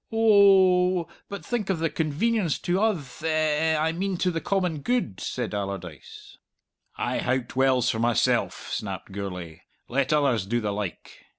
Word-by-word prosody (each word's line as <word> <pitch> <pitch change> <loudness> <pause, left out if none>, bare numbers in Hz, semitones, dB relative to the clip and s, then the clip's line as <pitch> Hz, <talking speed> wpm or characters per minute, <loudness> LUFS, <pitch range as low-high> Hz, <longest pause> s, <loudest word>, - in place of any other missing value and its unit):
"Oh 190 -5 +5
oh, - - -22 0.2
but 200 - -7
think 230 -5 -2
of 190 - +1
the 165 0 -1
convenience 170 +3 0
to 180 +3 -1
uth 165 - -2
eh - - 0
eh 155 0 +1
I 160 +1 +1
mean 185 +2 -2
to 180 +1 +1
the 165 -1 -3
common 180 -6 -1
good," 185 - -1
said - - -3
Allardyce. 95 -7 -7 0.6
"I - - -1
howked 130 0 -2
wells 130 -2 +3
for 110 - -4
myself," 120 -1 +1
snapped - - -5
Gourlay. 90 -5 -6 0.3
"Let 135 +1 0
others 135 -10 +2
do 120 +3 0
the 105 -3 -2
like." 100 -3 -6
155 Hz, 165 wpm, -25 LUFS, 120-185 Hz, 0.6 s, Oh